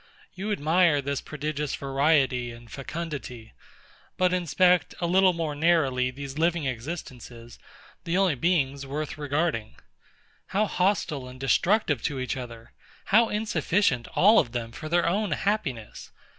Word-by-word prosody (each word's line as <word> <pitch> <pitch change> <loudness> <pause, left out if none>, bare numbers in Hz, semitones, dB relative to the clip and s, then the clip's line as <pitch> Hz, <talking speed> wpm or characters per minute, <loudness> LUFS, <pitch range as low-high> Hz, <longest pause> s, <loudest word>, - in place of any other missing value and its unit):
You 195 +3 -4
admire 165 -3 +3
this 140 0 -2
prodigious 150 -1 -4
variety 135 -3 +1
and 115 0 -12
fecundity. 135 -6 -6 0.6
But 180 0 +2
inspect 180 +1 +2
a 175 - -1
little 185 +2 +4
more 165 -3 -2
narrowly 145 -5 +2
these 140 +2 -7
living 165 -1 +1
existences, 125 -3 -7 0.4
the 170 +2 -1
only 190 -4 +3
beings 140 -2 0
worth 145 +1 -5
regarding. 145 -6 -1 0.7
How 205 +3 +1
hostile 180 -9 0
and 125 0 -11
destructive 145 - +2
to 145 -4 -1
each 130 +2 -2
other! 115 -3 -9 0.4
How 230 +2 +6
insufficient 180 - 0
all 215 +4 +6
of 120 - -1
them 115 -2 -4
for 155 +6 -8
their 175 +1 +2
own 200 +4 0
happiness! 135 - -3
150 Hz, 135 wpm, -26 LUFS, 130-175 Hz, 0.7 s, How